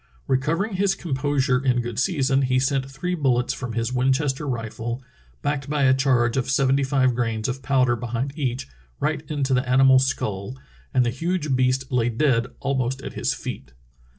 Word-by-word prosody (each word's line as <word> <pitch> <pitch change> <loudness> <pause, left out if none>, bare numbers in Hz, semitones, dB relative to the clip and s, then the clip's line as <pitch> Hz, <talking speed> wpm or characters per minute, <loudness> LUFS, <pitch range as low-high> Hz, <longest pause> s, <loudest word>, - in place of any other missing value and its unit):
Recovering 165 +10 0
his 200 0 +2
composure 135 -3 0
in 125 -2 +2
good 120 -2 -3
season, 135 -5 +2
he 130 -1 +2
sent 135 +1 0
three 165 +7 -3
bullets 130 -7 +1
from 125 -3 -5
his 115 +2 -1
Winchester 135 +3 +1
rifle, 120 0 -4 0.4
backed 145 -1 -2
by 150 -1 +1
a 130 -1 +5
charge 130 -3 +2
of 130 - +1
sevent3^ 135 0 +2
five 130 -2 +2
grains 115 -2 -1
of 135 +1 -3
powder 130 -2 +2
behind 120 +3 -3
each, 130 -4 -2 0.3
right - - 0
into 140 -3 0
the 125 0 0
animal's 130 0 +5
skull, 105 -2 -3 0.3
and 125 - +3
the 120 - +1
huge 155 +1 -1
beast 130 +1 +1
lay 120 -2 +2
dead 120 -1 +1
almost 130 -1 -1
at - - -6
his - - -1
feet.' 65 -2 -7
130 Hz, 175 wpm, -23 LUFS, 125-140 Hz, 0.4 s, a